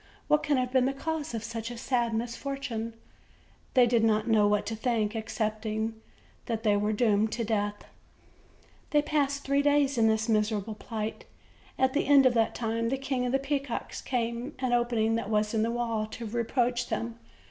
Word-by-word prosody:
what 300 - +4
can 290 -2 +1
have 250 -1 0
been 260 -1 +3
the 270 - 0
cause 310 -1 -3
of 225 - -4
such 230 0 -5
a 240 - -7
sad 240 -1 0
misfortune?" 235 -1 -4 0.8
They 250 -1 +7
did 235 -1 +2
not 215 0 +2
know 215 -2 +4
what 210 0 +1
to 225 - -3
think, 220 -1 0
excepting 220 0 -2 0.5
that 225 -2 -2
they 210 -2 +3
were 210 +1 +1
doomed 215 -1 +2
to 235 - -1
death. 205 -1 -1 1.0
They 295 -2 +3
passed 285 -2 0
three 280 +1 +2
days 285 -2 +2
in 225 - +5
this 220 0 +1
miserable 215 -1 0
plight. 215 0 -5 0.5
At 260 0 +2
the 290 - 0
end 280 -1 +7
of 255 - +5
that 225 -2 +1
time, 230 0 -1
the 270 - 0
King 265 -2 -1
of - - -1
the 270 - +3
Peacocks 275 -2 -3
came 240 +2 -2
to 265 - -4
an 245 - +1
opening 240 -2 +2
that 230 - -4
was 210 0 +1
in 220 - +2
the 225 - +1
wall, 230 -2 -1
to 230 +2 -7
reproach 240 +2 0
them. 230 0 -3
230 Hz, 190 wpm, -28 LUFS, 220-260 Hz, 1.0 s, They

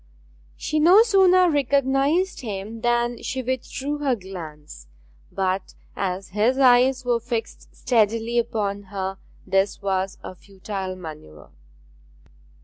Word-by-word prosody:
She 310 - -1
no 360 +8 +7
sooner 375 -4 +5
recognized 285 +4 +1
him 215 0 -6
than 240 0 0
she 260 -1 -3
withdrew 260 +3 -3
her 275 -4 +1
glance; 160 - -10 0.4
but 190 0 -2 0.2
as 190 0 -3
his 215 +7 +1
eyes 255 0 +4
were 240 -1 +2
fixed 230 -1 -5
steadily 230 0 +1
upon 205 -3 -2
her 195 0 -5 0.3
this 195 0 +1
was 195 -1 -2
a - - -7
futile 190 0 -6
manoeuvre. 155 - -11
230 Hz, 115 wpm, -23 LUFS, 195-265 Hz, 0.4 s, no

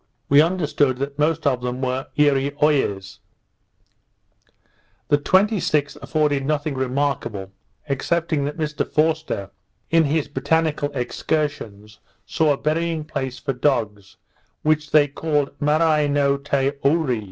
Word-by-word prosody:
We 140 +1 +7
understood 155 -6 +1
the 140 +1 -3
most 155 +1 0
of 130 -3 +1
them 125 0 -3
were 130 0 -2
Eareeoies. 140 -8 +1 1.9
The 145 - +4
26th 185 -4 +1
afforded 150 -3 0
nothing 150 +1 -1
remarkable, 130 -7 -2 0.4
excepting 155 +2 -1
that 145 +3 -4
Mr 150 -2 -1
Forster, 155 -11 0 0.4
in 165 -1 +4
his 150 +1 0
botanical 155 -1 0
excursions, 115 -6 -3 0.3
saw 155 -2 +2
a - - -4
burying 160 +1 -1
place 135 -4 -4
for 135 - -3
dogs, 110 -7 -1 0.5
which 155 0 +1
they 150 -2 +5
called 145 0 -1
Marai 150 0 +2
no 140 -1 +2
te 140 -1 0
Oore. 140 -4 +2
145 Hz, 120 wpm, -22 LUFS, 135-155 Hz, 1.9 s, We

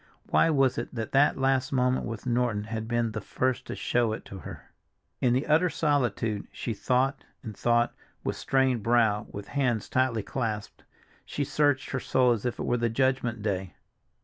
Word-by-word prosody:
Why - - +4
was 135 -4 +2
it - - -6
that 110 -2 -4
that 140 +2 +4
last 135 0 +1
moment 125 -1 +1
with 115 -2 -6
Norton 120 -4 0
had 110 0 -5
been 120 -1 0
the 110 0 -4
first 130 -1 -1
to - - -4
show 120 -2 +1
it - - -7
to 95 - -9
her? - - -10 0.5
In 125 - +2
the 130 +4 +1
utter 160 +4 +3
solitude 120 -10 0
she 115 - -4
thought 130 +5 0 0.2
and 110 -4 -7
thought, 120 +2 +2 0.3
with - - -2
strained 130 -3 +1
brow, 110 -2 +2
with 100 -1 -8
hands 125 -6 0
tightly 130 -4 +1
clasped. 110 -5 -4 0.4
She 145 - -3
searched 145 -1 +1
her 130 - -1
soul 125 0 +3
as 115 0 0
if 120 - -3
it - - -3
were 120 - +1
the 120 0 +1
judgment 120 -2 0
day. 95 -3 -2
120 Hz, 185 wpm, -28 LUFS, 110-130 Hz, 0.5 s, Why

